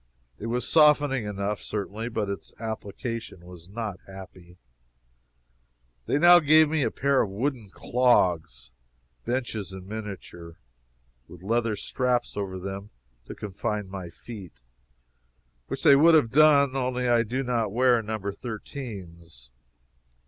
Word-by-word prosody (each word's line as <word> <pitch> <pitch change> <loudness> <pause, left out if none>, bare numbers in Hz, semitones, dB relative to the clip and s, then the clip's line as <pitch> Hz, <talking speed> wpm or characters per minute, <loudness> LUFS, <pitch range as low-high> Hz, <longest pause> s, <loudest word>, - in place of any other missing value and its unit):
It 110 - -5
was 120 +1 -2
softening 145 -6 +4
enough, 100 0 -3
certainly, 105 +2 -4
but 110 -3 -2
its 100 0 -6
application 110 -2 -6
was 90 -1 -13
not 105 -3 -5
happy. 95 -2 -12 1.5
They - - +2
now 175 +3 +8
gave 155 0 +5
me 155 -1 0
a - - +1
pair 140 0 +1
of 105 - -1
wooden 115 +1 -3
clogs 90 - +1 0.5
benches 115 -6 -3
in 95 -1 -9
miniature, 95 -6 -8 0.7
with 90 0 -14
leather 115 +1 0
straps 125 +3 -1
over 95 -2 -4
them 100 +2 -6 0.4
to - - -9
confine 105 0 -4
my 95 -2 -7
feet 90 - -11 1.0
(which - - -4
they 140 - +8
would 160 +4 +6
have 120 -8 +3
done, 140 -2 +5
only 125 -1 -1
I 120 -1 +4
do 125 +4 -2
not 115 -5 -1
wear 120 +1 +3
No. 110 0 -4
13s.) 100 - -8
110 Hz, 130 wpm, -26 LUFS, 95-125 Hz, 1.5 s, now